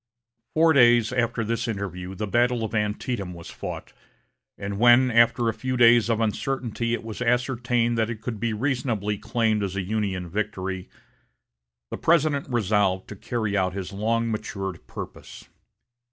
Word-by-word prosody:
Four 160 0 +5
days 120 -3 +5
after 120 -2 0
this 115 +2 -2
interview 95 -4 -4
the 105 - -3
battle 120 +2 +1
of 110 0 -4
Antietam 105 -2 -2
was 85 -1 -10
fought, - - -7 0.6
and 100 0 -5
when, 120 +2 +6
after 115 0 +4
a 115 - +1
few 130 +2 -3
days 120 -2 +6
of 115 -1 +1
uncertainty 115 +1 -1
it - - -8
was 110 +1 -7
ascertained 120 -1 +1
that 110 0 +1
it 115 -2 -5
could 110 -1 -5
be 115 +1 -1
reasonably 110 -4 -1
claimed 110 -2 0
as 100 -1 -3
a 95 - -1
Union 95 -3 -2
victory, 95 -1 -3 1.0
the - - -3
President 155 -4 +2
resolved 100 -5 +1
to 105 - -7
carry 110 0 -2
out 95 -2 +1
his 95 0 -5
long 115 +3 0
matured 100 -5 -5
purpose. - - -9
115 Hz, 155 wpm, -25 LUFS, 100-120 Hz, 1.0 s, when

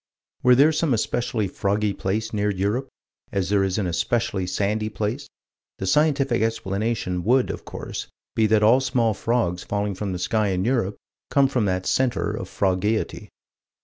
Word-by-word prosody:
Were 125 0 +6
there 145 +5 +6
some 155 -4 +1
especially 115 -1 -1
froggy 100 +2 0
place 110 +4 -2
near 105 0 +1
Europe, 105 +7 -1 0.4
as 95 -3 -1
there 100 -1 +3
is 95 -1 0
an 105 - 0
especially 95 +3 -1
sandy 105 +4 -1
place, 110 +7 -3 0.5
the 95 - -4
scientific 140 0 +2
explanation 105 -4 -1
would 125 +5 +3
of - - -8
course - - -6 0.3
be 110 -1 +3
that 105 0 +3
all 120 +5 +6
small 125 -4 +1
frogs 95 -5 -1
falling 100 0 -2
from 100 +1 -4
the 90 - -3
sky 105 +4 0
in 95 0 0
Europe 115 -5 0 0.3
come 140 -1 +4
from 125 -5 0
that 95 -1 -1
center 130 -2 +1
of - - -5
frogeity. 100 +3 -1
105 Hz, 165 wpm, -24 LUFS, 95-120 Hz, 0.5 s, Were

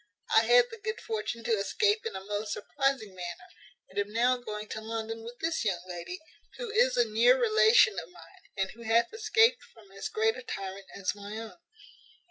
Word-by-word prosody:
I 225 - +6
had 240 +1 +6
the 455 - -9
good 445 +1 -3
fortune 430 - -4
to 235 - -2
escape 420 - +1
in - - -6
a 190 - -7
most 205 +1 -3
surprizing 270 -4 -1
manner, 175 -2 -7 0.4
and 195 - -5
am 205 0 -2
now 245 +3 +3
going 215 -3 -6
to 220 - -5
London 225 0 -4
with 235 +2 -9
this 325 -4 0
young 185 -5 -1
lady, 180 - -6 0.4
who 480 -3 -5
is 480 +3 +3
a 240 - +5
near 240 +4 +4
relation 215 -3 +5
of 165 - -10
mine, 170 -2 -16 0.2
and 190 0 -1
who 235 - -14
hath 230 - +2
escaped 445 +2 +3
from 215 -4 -19
as 195 0 -5
great 220 +1 +1
a 255 - -7
tyrant 195 -4 -6
as 195 - -1
my 205 +1 -8
own." 220 -6 -8
225 Hz, 200 wpm, -29 LUFS, 200-255 Hz, 0.4 s, I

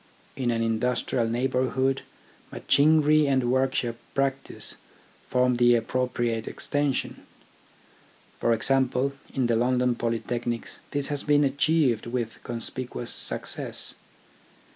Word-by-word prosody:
In 130 -3 -1
an 115 -1 0
industrial 115 +1 0
neighbourhood, 130 +2 0 0.5
machinery 155 0 +4
and 130 -3 +2
workshop 130 -3 0 0.2
practice 135 0 -2 0.5
form 125 -1 +2
the 120 0 +5
appropriate 120 -2 -1
extension. 145 -2 -1 1.2
'For 120 - +1
example, 135 +3 +2 0.2
in 130 -2 +1
the 120 -1 +2
London 125 +1 +2
Polytechnics 120 0 -3
this 145 0 -2
has 145 -1 -1
been 145 0 +3
achieved 140 -4 +2
with 120 -2 -4
conspicuous 120 +1 -5
success. - - 0
125 Hz, 100 wpm, -26 LUFS, 120-135 Hz, 1.2 s, the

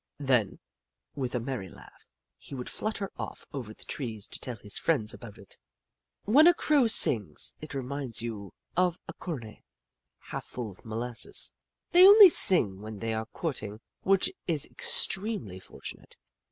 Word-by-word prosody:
Then, 130 -8 +1 0.6
with 130 -3 -4
a - - 0
merry 120 -6 -5
laugh, - - -16 0.3
he 140 - -10
would 125 -1 -6
flutter 210 -2 -4
off - - -7
over 125 -6 -6
the - - -11
trees 110 -7 -5
to - - -4
tell 125 - -5
his 105 -2 -4
friends 115 -10 0
about 105 -4 -11
it. 100 - -13 0.6
When 285 +10 +6
a 350 - +6
Crow 290 -8 +2
sings, 105 - +2
it 155 -2 -8
reminds 135 -2 -5
you 105 -5 -6 0.2
of 180 -1 +1
a - - -7
cornet 120 - -8 0.6
half - - -8
full 120 -4 -6
of 95 - -17
molasses. 115 +2 -1 0.4
They 360 +1 +8
only 405 -1 +10
sing 105 - +4
when 110 0 -8
they 115 +2 -3
are 110 0 -4
courting, 110 - -5 0.2
which 195 0 +2 0.2
is 160 -5 +1
extremely 190 - +2
fortunate. 90 - -11
125 Hz, 155 wpm, -28 LUFS, 110-180 Hz, 0.6 s, only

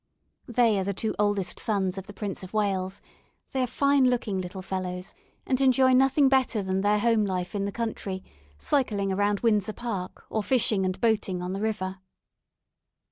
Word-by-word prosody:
They 235 -4 +3
are - - 0
the 200 0 -2
two 220 +2 -1
oldest 205 -3 0
sons 195 -4 0
of 195 -1 -7
the 205 - -9
Prince 200 -2 -4
of 185 +1 -10
Wales; 195 -2 -1 0.5
they 265 - 0
are 250 - +1
fine 280 +2 +3
looking 225 -6 0
little 185 +1 -7
fellows, 185 -1 -4 0.3
and 260 0 +1
enjoy 260 0 +5
nothing 270 +2 +5
better 260 -5 +2
than 190 0 -1
their 205 +1 +3
home 225 0 +3
life 185 -3 -2
in 200 -1 -1
the 200 - -2
country, 200 -4 -4 0.3
cycling 200 - 0
around 205 +1 +1
Windsor 215 -2 +2
Park, 205 -7 -5
or 220 - -1
fishing 210 -4 +2
and 185 0 -2
boating 205 -5 +1
on 180 +1 -3
the 195 - -4
river. 195 -3 -2
205 Hz, 180 wpm, -27 LUFS, 190-235 Hz, 0.5 s, enjoy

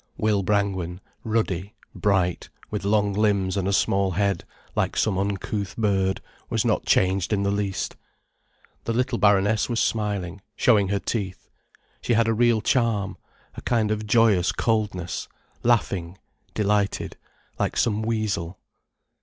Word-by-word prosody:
Will 105 -2 +2
Brangwen, 95 -3 -1 0.2
ruddy, 105 -4 -1 0.2
bright, 95 -4 0 0.2
with 105 -2 -3
long 100 0 +2
limbs 100 -2 +1
and 95 -1 -1
a - - +1
small 95 0 +2
head, 100 +2 0 0.3
like - - 0
some 110 -3 +2
uncouth 100 0 -3
bird, 95 -3 +1 0.3
was - - 0
not - - 0
changed 95 +1 +2
in 100 -2 +1
the 100 - +1
least. 100 -1 -2 0.9
The 115 - -1
little 125 0 0
Baroness 105 +2 +3
was 120 -1 0
smiling, 100 -4 -1
showing 105 -6 +4
her 100 +1 0
teeth. 100 -2 -4 0.5
She 120 - 0
had 115 0 +3
a 115 - +3
real 120 -1 +3
charm, 110 -4 +1 0.4
a - - -9
kind 110 -3 +1
of 110 0 -2
joyous 105 -5 +4
coldness, 105 -6 -1 0.3
laughing, 95 -7 +1 0.4
delighted, 105 -1 0 0.4
like - - -1
some 110 -2 +1
weasel. 110 -6 -2
100 Hz, 135 wpm, -24 LUFS, 95-110 Hz, 0.9 s, showing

